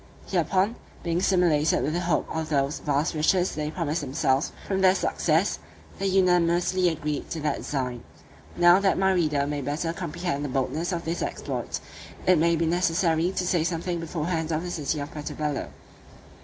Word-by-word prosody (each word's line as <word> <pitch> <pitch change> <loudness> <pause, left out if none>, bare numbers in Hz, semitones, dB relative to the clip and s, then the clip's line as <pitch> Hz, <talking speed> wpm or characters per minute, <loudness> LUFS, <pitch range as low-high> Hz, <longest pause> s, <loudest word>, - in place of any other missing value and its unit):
Hereupon, 190 +5 +1 0.3
being 170 0 0
stimulated 175 -5 +3
with 155 - -1
the 175 - 0
hope 175 -2 0
of 160 -1 -2
those 140 0 0
vast 145 +3 0
riches 175 +4 +2
they 150 -1 -3
promised 160 -1 -2
themselves 135 +1 0 0.2
from 190 -1 0
their 190 0 +5
success, - - +1 0.4
they 195 - 0
unanimously 180 -1 +3
agreed 150 -2 -3
to 165 - -4
that 150 -2 0
design. 125 -4 -3 0.5
Now, 175 +1 +7
that 195 -1 +2
my 190 0 +3
reader 155 -6 +1
may 145 0 -2
better 155 +5 -2
comprehend 170 -4 -3
the 145 - -3
boldness 145 +7 -1
of 170 -1 -3
this 165 +1 -2
exploit, - - -3 0.5
it 180 -3 +5
may 170 +1 +3
be 165 +1 0
necessary 170 0 +2
to 185 - -2
say 175 -2 +2
something 170 +1 -2
beforehand 165 0 -2
of 160 +1 -1
the 180 - -4
city 150 -2 -2
of 145 +1 -5
Puerto 150 -1 -6
Bello. 150 -2 -2
165 Hz, 175 wpm, -26 LUFS, 150-180 Hz, 0.5 s, Now